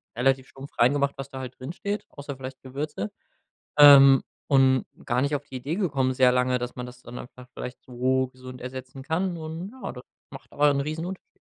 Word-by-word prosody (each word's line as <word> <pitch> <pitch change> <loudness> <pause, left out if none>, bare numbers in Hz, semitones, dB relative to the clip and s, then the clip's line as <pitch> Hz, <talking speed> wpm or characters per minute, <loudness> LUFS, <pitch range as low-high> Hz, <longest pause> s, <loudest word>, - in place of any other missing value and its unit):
relativ 130 +2 +2
stumpf 135 +1 -11
rein 125 +3 +5
gemacht, 140 -1 +1
was 135 0 -6
da 135 - -7
halt 130 -1 -8
drinsteht, 175 +10 -4
außer 140 -1 -8
vielleicht 130 0 -8
Gewürze. 135 -6 -4 0.7
Ähm, 140 -2 +9 0.2
und 130 -2 +4 0.2
gar 120 +1 +1
nicht 140 +2 0
auf 145 0 -3
die 130 - -9
Idee 135 +5 -3
gekommen 140 -10 0
sehr 125 -1 +5
lange, 125 0 +2
dass 125 0 -5
man 125 -1 -5
das 125 0 -13
dann 120 +1 -8
einfach 125 +1 -11
vielleicht 125 - -7
so 130 +1 0
gesund 130 0 -11
ersetzen 130 +1 -7
kann. 170 +5 -1
Und, 165 +4 -6
ja, 260 - -6
das 125 -1 -10 0.3
macht 135 -1 -12
aber 145 0 +4
'n 140 -1 +1
Riesenunterschied. 165 +6 -5
135 Hz, 200 wpm, -26 LUFS, 125-145 Hz, 0.7 s, Ähm